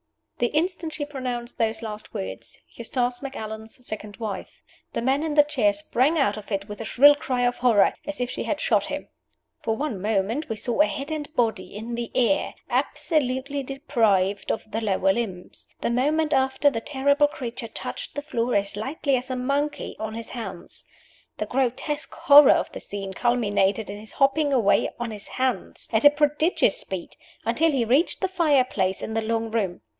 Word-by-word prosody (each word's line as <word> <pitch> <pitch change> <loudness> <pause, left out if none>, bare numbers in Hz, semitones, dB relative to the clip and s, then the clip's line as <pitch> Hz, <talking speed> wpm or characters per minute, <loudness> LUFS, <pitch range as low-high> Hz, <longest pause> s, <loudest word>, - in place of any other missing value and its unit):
The 240 - +3
instant 325 +2 -1
she 290 - -3
pronounced 250 -4 -5
those 225 0 0
last 215 -1 -6
words, 95 +4 -5
"Eustace 245 +1 -1
Macallan's 220 -3 -7
second 210 -2 -6
wife," 210 -4 -6 0.3
the - - -1
man 265 +3 +2
in 310 -2 -2
the 295 - +8
chair 260 -8 +2
sprang 250 +9 +1
out 270 -9 +2
of 215 0 -10
it 195 0 -2
with 210 +1 -7
a - - -4
shrill 285 +6 +7
cry 260 -3 -2
of 245 0 +1
horror, 230 -6 +4
as 295 -2 -4
if 245 0 -1
she - - -4
had - - -1
shot - - +2
him. - - -5 0.5
For 225 - 0
one 270 -10 -3
moment 215 +7 0
we 225 - -1
saw 235 +5 0
a 310 - +5
head 280 +3 -5
and 305 -1 -4
body 230 -5 0
in 225 +3 -5
the 235 0 -4
air, 255 +4 +2 0.2
absolutely 280 -2 0
deprived 225 -8 +1
of 220 - -4
the 220 +2 -2
lower 195 -2 +2
limbs. 190 -6 -5
The - - 0
moment 300 +5 +1
after, 265 +2 +3
the 225 - -3
terrible 285 +2 +2
creature 245 -5 -6
touched - - -6
the 290 - -3
floor 245 -5 -1
as 200 0 0
lightly 270 +5 -1
as 250 +2 -6
a 255 - -1
monkey, 280 +4 -1
on 220 0 -4
his 230 0 -6
hands. 195 -7 -6 0.5
The 215 - -2
grotesque 265 +5 -2
horror 285 -1 +8
of - - -1
the - - -7
scene 195 -1 -6
culminated 210 -3 +1
in 205 - -7
his 215 0 -9
hopping 285 +2 +2
away 230 -7 +3
on 240 -1 -3
his 210 -1 -8
hands, 260 -1 -2
at 220 - +3
a - - +12
prodigious 295 +3 +2
speed, 190 -3 -6 0.3
until 275 +9 +3
he 265 -6 +1
reached 270 +9 +2
the 380 - +2
fire 320 -8 +3
place 190 -6 -1
in 220 - -4
the 225 - 0
long 225 0 -1
room. 200 -6 -1
245 Hz, 190 wpm, -25 LUFS, 215-285 Hz, 0.5 s, a